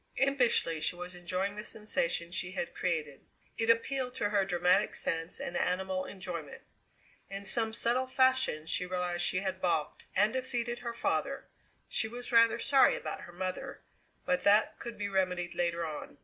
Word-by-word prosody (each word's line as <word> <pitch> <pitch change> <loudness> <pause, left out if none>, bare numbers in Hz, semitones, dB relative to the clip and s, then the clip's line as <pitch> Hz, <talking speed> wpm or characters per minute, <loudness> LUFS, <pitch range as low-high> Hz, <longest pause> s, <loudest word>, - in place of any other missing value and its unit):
Impishly 245 - +2
she 155 - 0
was 180 +1 -5
enjoying 185 +3 -2
the 210 - -4
sensation 170 -5 -1
she 180 +1 -1
had 175 - -3
created. 155 -6 -2 0.4
It 225 - +1
appealed 250 +2 +2
to 205 - 0
her 205 -1 +3
dramatic 180 +2 +2
sense 165 +1 -1
and 175 - -5
animal 185 +1 0
enjoyment. 180 -6 -6 0.7
In 195 0 -6
some 225 +2 +1
subtle 240 +3 +1
fashion 260 -12 +2
she 170 - 0
realized 180 -1 -1
she 185 - +1
had 190 -1 -3
balked 160 -4 -1
and 210 +3 +3
defeated 245 -2 -2
her 235 -1 -5
father - - -1 0.4
she 220 - -1
was 245 +3 -8
rather 230 -1 +6
sorry 270 +3 +5
about - - -5
her 175 - -10
mother 185 +1 -5 0.4
but 270 -1 +1
that 205 +2 +4
could 235 - -6
be 205 - -2
remedied 180 -2 0
later 170 -1 0
on. 150 -2 -7
190 Hz, 165 wpm, -31 LUFS, 175-230 Hz, 0.7 s, rather